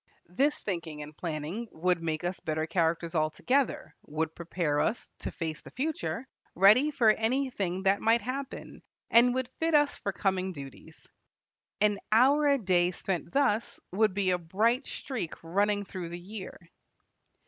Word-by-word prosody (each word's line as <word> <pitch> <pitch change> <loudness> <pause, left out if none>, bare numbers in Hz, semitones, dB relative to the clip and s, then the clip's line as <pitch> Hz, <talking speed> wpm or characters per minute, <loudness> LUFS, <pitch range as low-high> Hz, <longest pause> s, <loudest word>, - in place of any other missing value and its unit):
This 275 +12 +1
thinking 165 -6 -4
and 150 0 -11
planning 165 +8 -4
would 175 +1 0
make 160 -1 -2
us 175 +1 -2
better 155 0 -2
characters 165 0 0
altogether, 180 - 0
would 160 +1 -2
prepare 165 -3 -1
us 230 +8 -1
to - - -4
face 160 -3 -4
the - - -12
future, 255 - -3 0.3
ready 210 - +6
for 245 -7 +3
anything 220 -6 -1
that 195 +1 +3
might 230 +1 +4
happen, 260 +3 -6 0.3
and 245 +2 +6
would 260 -1 -1
fit 325 -1 +2
us 290 -1 +4
for 200 - -2
coming 190 -1 -1
duties. 140 -4 -11 0.7
An 210 -1 +3
hour 275 +7 +5
a 280 -1 +4
day 180 -6 +2
spent 180 -1 -4
thus 240 -6 +1
would 205 0 +2
be 195 -2 +2
a 180 - +1
bright 220 - +1
streak 245 - -4
running 205 +4 +1
through 185 -3 -6
the 175 +1 -6
year. 190 +2 -8
195 Hz, 155 wpm, -29 LUFS, 170-235 Hz, 0.7 s, ready